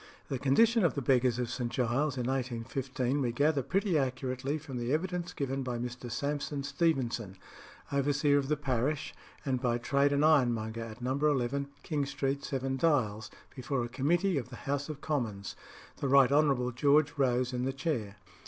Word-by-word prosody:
The 135 Hz, -, -2 dB
condition 225 Hz, -, +4 dB
of 170 Hz, -, +2 dB
the 140 Hz, -, -1 dB
beggars 125 Hz, -1 st, +3 dB
of 125 Hz, -2 st, -2 dB
St. 120 Hz, -2 st, -3 dB
Giles 130 Hz, +3 st, 0 dB
in 125 Hz, -, -1 dB
1815 130 Hz, +1 st, -2 dB
we 120 Hz, -3 st, 0 dB
gather 145 Hz, +4 st, +2 dB
pretty 185 Hz, -, +1 dB
accurately 130 Hz, +1 st, -2 dB
from 140 Hz, -4 st, -7 dB
the 120 Hz, +1 st, -2 dB
evidence 180 Hz, +3 st, -1 dB
given 135 Hz, -1 st, -2 dB
by 125 Hz, -2 st, -3 dB
Mr. 120 Hz, +1 st, -5 dB
Sampson 140 Hz, +3 st, -2 dB
Stevenson, 120 Hz, -, -1 dB, 0.5 s
overseer 145 Hz, +1 st, +2 dB
of 135 Hz, -, -3 dB
the 150 Hz, +1 st, +1 dB
parish, 135 Hz, +1 st, -1 dB, 0.3 s
and 130 Hz, -3 st, 0 dB
by 120 Hz, -2 st, +1 dB
trade 140 Hz, +4 st, +2 dB
an 145 Hz, +1 st, +2 dB
ironmonger 120 Hz, -7 st, +2 dB
at 115 Hz, +1 st, -8 dB
No. 130 Hz, +1 st, 0 dB
11 140 Hz, -2 st, +1 dB, 0.2 s
King 145 Hz, -4 st, -1 dB
Street, 140 Hz, 0 st, -2 dB
Seven 135 Hz, 0 st, -2 dB
Dials, 110 Hz, -9 st, +1 dB, 0.3 s
before 130 Hz, -1 st, -2 dB
a -, -, -3 dB
committee 165 Hz, +7 st, +1 dB
of 125 Hz, -, -7 dB
the 125 Hz, -, -9 dB
House 140 Hz, +2 st, -1 dB
of 150 Hz, -2 st, -6 dB
Commons, 115 Hz, -, -3 dB, 0.4 s
the 140 Hz, -, -2 dB
Right 135 Hz, -1 st, +6 dB
Honourable 140 Hz, -4 st, +3 dB
George 145 Hz, +4 st, +3 dB
Rose 125 Hz, -1 st, +2 dB
in 125 Hz, 0 st, -1 dB
the 135 Hz, -, 0 dB
chair. 130 Hz, -9 st, -2 dB
135 Hz, 175 wpm, -31 LUFS, 125-145 Hz, 0.5 s, Right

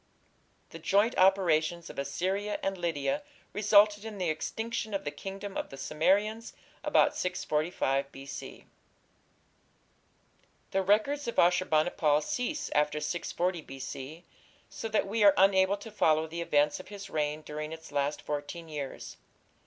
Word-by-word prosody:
The 165 Hz, -, -9 dB
joint 200 Hz, +8 st, +2 dB
operations 175 Hz, -3 st, +3 dB
of -, -, -8 dB
Assyria 190 Hz, +9 st, -1 dB
and 195 Hz, 0 st, 0 dB
Lydia 175 Hz, -, -1 dB, 0.3 s
resulted 210 Hz, 0 st, +5 dB
in 220 Hz, -2 st, -7 dB
the 180 Hz, -4 st, 0 dB
extinction 220 Hz, +6 st, -3 dB
of 195 Hz, -, -2 dB
the 145 Hz, -, -3 dB
kingdom 195 Hz, +5 st, -7 dB
of -, -, -3 dB
the 135 Hz, -, -10 dB
Cimmerians 205 Hz, +10 st, +1 dB, 0.3 s
about -, -, +3 dB
645 150 Hz, -5 st, -1 dB
B.C. 135 Hz, 0 st, -9 dB, 2.1 s
The 195 Hz, -, +2 dB
records 220 Hz, +9 st, +2 dB
of 235 Hz, -, -4 dB
Ashur 180 Hz, +1 st, +4 dB
bani 155 Hz, +2 st, +2 dB
pal 150 Hz, -5 st, +3 dB
cease 285 Hz, -, -3 dB
after 150 Hz, 0 st, +2 dB
640 175 Hz, +3 st, -2 dB
B.C., 135 Hz, +4 st, -8 dB, 0.5 s
so -, -, -5 dB
that 215 Hz, -2 st, +1 dB
we 215 Hz, +2 st, +1 dB
are 200 Hz, -1 st, +7 dB
unable 190 Hz, +1 st, +4 dB
to 215 Hz, +2 st, -10 dB
follow 160 Hz, -6 st, +3 dB
the 165 Hz, +2 st, -5 dB
events 150 Hz, -2 st, +2 dB
of -, -, -10 dB
his 200 Hz, -1 st, -8 dB
reign 150 Hz, 0 st, -1 dB
during 150 Hz, +1 st, -5 dB
its 160 Hz, -1 st, -9 dB
last 145 Hz, +1 st, -1 dB
fourteen 150 Hz, +3 st, -5 dB
years. 145 Hz, -3 st, -6 dB
175 Hz, 145 wpm, -30 LUFS, 150-205 Hz, 2.1 s, are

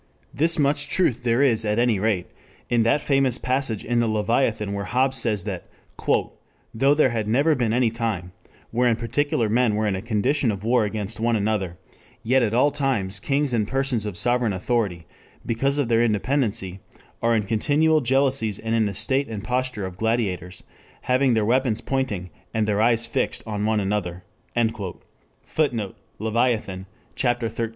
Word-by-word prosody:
This 160 Hz, +5 st, +3 dB
much 145 Hz, 0 st, +1 dB
truth 130 Hz, -10 st, +2 dB
there 120 Hz, +2 st, +2 dB
is 115 Hz, -5 st, +3 dB
at 105 Hz, 0 st, 0 dB
any 120 Hz, -4 st, +2 dB
rate 100 Hz, -4 st, 0 dB, 0.5 s
in 120 Hz, -1 st, +3 dB
that 115 Hz, +6 st, +2 dB
famous 135 Hz, -3 st, +2 dB
passage 130 Hz, -5 st, -2 dB
in 120 Hz, 0 st, +1 dB
the 120 Hz, -, +2 dB
Leviathan 110 Hz, -1 st, 0 dB
where 100 Hz, 0 st, -3 dB
Hobbes 130 Hz, +2 st, +1 dB
says 105 Hz, -7 st, +1 dB
that -, -, -5 dB, 1.1 s
"though 135 Hz, +5 st, +3 dB
there 145 Hz, -4 st, +3 dB
had 110 Hz, -3 st, -2 dB
never 140 Hz, +8 st, +3 dB
been 120 Hz, -6 st, 0 dB
any 120 Hz, -1 st, +2 dB
time 110 Hz, -6 st, -3 dB, 0.4 s
wherein 120 Hz, 0 st, +2 dB
particular 120 Hz, +2 st, 0 dB
men 115 Hz, 0 st, +2 dB
were 110 Hz, +1 st, 0 dB
in 100 Hz, -2 st, 0 dB
a 95 Hz, -, -4 dB
condition 120 Hz, +5 st, 0 dB
of 100 Hz, -1 st, -6 dB
war 120 Hz, +3 st, +3 dB
one 110 Hz, -, +1 dB
against 105 Hz, +1 st, -5 dB
another, 105 Hz, -6 st, 0 dB, 0.5 s
yet 130 Hz, +3 st, +3 dB
at 115 Hz, -1 st, 0 dB
all 145 Hz, +4 st, +4 dB
times 125 Hz, -9 st, -1 dB
kings 140 Hz, +4 st, 0 dB
and 110 Hz, -3 st, +1 dB
persons 135 Hz, -4 st, 0 dB
of 95 Hz, -4 st, -5 dB
sovereign 120 Hz, 0 st, +1 dB
authority 95 Hz, -3 st, -1 dB, 0.4 s
because 135 Hz, +5 st, 0 dB
of 145 Hz, -4 st, +1 dB
their 115 Hz, 0 st, +3 dB
independency, 105 Hz, -4 st, 0 dB, 0.4 s
are 115 Hz, 0 st, +2 dB
in 110 Hz, -, +1 dB
continual 150 Hz, +9 st, +2 dB
jealousies 130 Hz, -5 st, +2 dB
and 115 Hz, 0 st, -3 dB
in 110 Hz, -2 st, +2 dB
the 100 Hz, -, -5 dB
state 135 Hz, +6 st, +1 dB
and 105 Hz, -3 st, -6 dB
posture 125 Hz, -3 st, -2 dB
of 95 Hz, -1 st, -8 dB
gladiators, 95 Hz, -6 st, -2 dB, 0.4 s
having 130 Hz, -1 st, +2 dB
their 110 Hz, -2 st, +1 dB
weapons 120 Hz, -1 st, +1 dB
pointing, 110 Hz, -10 st, -3 dB, 0.2 s
and 110 Hz, -1 st, +1 dB
their 105 Hz, 0 st, +1 dB
eyes 115 Hz, 0 st, +4 dB
fixed 115 Hz, -, -1 dB
on 105 Hz, -1 st, -2 dB
one 110 Hz, -1 st, +2 dB
another..." 95 Hz, -3 st, -2 dB, 1.2 s
[Footnote: 120 Hz, -11 st, -1 dB, 0.2 s
Leviathan, 110 Hz, -4 st, -1 dB, 0.3 s
Ch. -, -, -3 dB, 0.2 s
XIII. 115 Hz, -1 st, -3 dB
115 Hz, 170 wpm, -23 LUFS, 105-130 Hz, 1.2 s, all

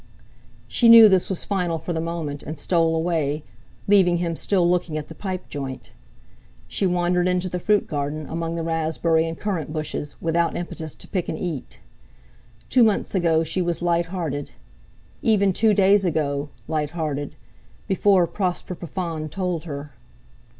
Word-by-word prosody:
She 235 Hz, -, +3 dB
knew 230 Hz, -1 st, +11 dB
this 190 Hz, -3 st, +2 dB
was 190 Hz, -, -1 dB
final 180 Hz, -4 st, -1 dB
for 165 Hz, +2 st, -4 dB
the 160 Hz, -, -1 dB
moment, 165 Hz, -4 st, -4 dB
and 155 Hz, +1 st, -6 dB
stole 165 Hz, -1 st, +2 dB
away, 160 Hz, -3 st, -1 dB, 0.4 s
leaving 190 Hz, -4 st, +5 dB
him 170 Hz, -1 st, -2 dB
still 180 Hz, 0 st, +1 dB
looking 175 Hz, -3 st, 0 dB
at 150 Hz, -1 st, -6 dB
the -, -, -8 dB
pipe 185 Hz, +1 st, -5 dB
joint. 135 Hz, -2 st, -6 dB, 0.8 s
She 195 Hz, -, 0 dB
wandered 180 Hz, 0 st, +1 dB
into 180 Hz, 0 st, 0 dB
the 180 Hz, -, -3 dB
fruit 210 Hz, +3 st, +2 dB
garden, 145 Hz, +1 st, -3 dB
among 165 Hz, +1 st, -3 dB
the 165 Hz, -, -3 dB
raspberry 165 Hz, 0 st, +1 dB
and 165 Hz, 0 st, -5 dB
currant 185 Hz, -8 st, -3 dB
bushes, 150 Hz, -1 st, -4 dB
without 170 Hz, +1 st, 0 dB
impetus 160 Hz, -3 st, -5 dB
to -, -, -10 dB
pick 185 Hz, -4 st, -2 dB
and 160 Hz, -, -3 dB
eat. 160 Hz, -7 st, -5 dB, 0.9 s
Two 250 Hz, -, +4 dB
months 215 Hz, -3 st, +1 dB
ago—she 165 Hz, -1 st, +1 dB
was 175 Hz, -1 st, -1 dB
light 170 Hz, -1 st, +1 dB
hearted! 160 Hz, -6 st, -4 dB, 0.7 s
Even 200 Hz, -4 st, +3 dB
two 220 Hz, +3 st, +3 dB
days 200 Hz, 0 st, +4 dB
ago—light 150 Hz, -1 st, -2 dB
hearted, 145 Hz, -3 st, -3 dB, 0.5 s
before 190 Hz, -1 st, +4 dB
Prosper 180 Hz, 0 st, -2 dB
Profond 165 Hz, -2 st, -5 dB
told 180 Hz, -3 st, -2 dB
her. 145 Hz, -2 st, -6 dB
170 Hz, 155 wpm, -23 LUFS, 155-185 Hz, 0.9 s, knew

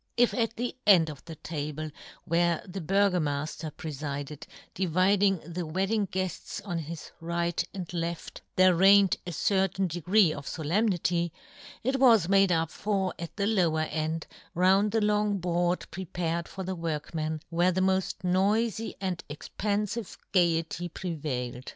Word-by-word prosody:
If 245 Hz, 0 st, +4 dB
at 230 Hz, -2 st, 0 dB
the 245 Hz, +2 st, -3 dB
end 170 Hz, -6 st, +6 dB
of 140 Hz, -, -12 dB
the 165 Hz, -1 st, -8 dB
table 155 Hz, 0 st, -5 dB, 0.3 s
where 170 Hz, 0 st, +1 dB
the 190 Hz, +1 st, -6 dB
Burgomafter 165 Hz, -5 st, 0 dB
prefided, 145 Hz, 0 st, -5 dB, 0.3 s
dividing 190 Hz, +2 st, +3 dB
the 170 Hz, +2 st, -4 dB
wedding 195 Hz, +6 st, 0 dB
guefts 185 Hz, +2 st, -3 dB
on 175 Hz, -4 st, -3 dB
his 165 Hz, 0 st, -7 dB
right 170 Hz, 0 st, -1 dB
and 180 Hz, -3 st, -7 dB
left, 170 Hz, -1 st, -4 dB
there 185 Hz, 0 st, +6 dB
reigned 195 Hz, +2 st, +6 dB
a -, -, -3 dB
certain 195 Hz, +2 st, +1 dB
degree 175 Hz, +1 st, +3 dB
of 140 Hz, -, -8 dB
folemnity, 175 Hz, 0 st, 0 dB, 0.5 s
it 265 Hz, +3 st, 0 dB
was 230 Hz, -9 st, +6 dB
made 195 Hz, -1 st, +4 dB
up 165 Hz, -2 st, +1 dB
for 195 Hz, -3 st, -1 dB
at 170 Hz, -1 st, -7 dB
the 200 Hz, -, +1 dB
lower 175 Hz, -7 st, +2 dB
end, 155 Hz, +1 st, -2 dB, 0.3 s
round 190 Hz, +4 st, +4 dB
the 225 Hz, +1 st, +1 dB
long 210 Hz, -1 st, +2 dB
board 175 Hz, 0 st, 0 dB
pre 190 Hz, +3 st, -5 dB
pared 170 Hz, -1 st, -2 dB
for 190 Hz, -, -6 dB
the 190 Hz, +1 st, -3 dB
workmen, 160 Hz, -1 st, -3 dB
where 175 Hz, +2 st, +3 dB
the 185 Hz, +1 st, 0 dB
moft 190 Hz, -1 st, 0 dB
noify 210 Hz, +5 st, +1 dB
and 185 Hz, -3 st, -3 dB
expanfive 205 Hz, +7 st, -3 dB
gaiety 170 Hz, -1 st, +1 dB
pre 180 Hz, +1 st, -4 dB
vailed. 125 Hz, -5 st, -4 dB
175 Hz, 150 wpm, -28 LUFS, 160-195 Hz, 0.5 s, end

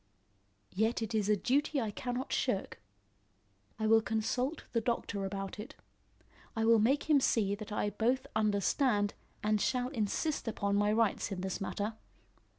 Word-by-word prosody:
"Yet 220 Hz, +4 st, +1 dB
it 225 Hz, +1 st, -4 dB
is 210 Hz, -2 st, +1 dB
a 210 Hz, -, +4 dB
duty 285 Hz, +7 st, +1 dB
I 220 Hz, -4 st, -1 dB
cannot 245 Hz, +4 st, -3 dB
shirk. 205 Hz, -7 st, -1 dB, 1.0 s
I 220 Hz, -, -2 dB
will 225 Hz, +1 st, +6 dB
consult 240 Hz, +7 st, -1 dB
the 230 Hz, -, +1 dB
doctor 210 Hz, -4 st, -2 dB
about 195 Hz, 0 st, -5 dB
it. 215 Hz, -, -8 dB, 0.8 s
I 225 Hz, 0 st, +1 dB
will 230 Hz, 0 st, +6 dB
make 265 Hz, +9 st, +2 dB
him 300 Hz, -3 st, +5 dB
see 210 Hz, -6 st, +2 dB
that 210 Hz, +1 st, -6 dB
I 210 Hz, 0 st, 0 dB
both 245 Hz, +5 st, +1 dB
understand 210 Hz, +1 st, +2 dB, 0.3 s
and 210 Hz, 0 st, +2 dB
shall 250 Hz, -1 st, 0 dB
insist 255 Hz, +4 st, -1 dB
upon 200 Hz, -2 st, 0 dB
my 205 Hz, +1 st, +3 dB
rights 220 Hz, -2 st, +1 dB
in 185 Hz, -2 st, -3 dB
this 190 Hz, 0 st, -3 dB
matter. 205 Hz, +3 st, -2 dB
220 Hz, 155 wpm, -32 LUFS, 205-245 Hz, 1.0 s, will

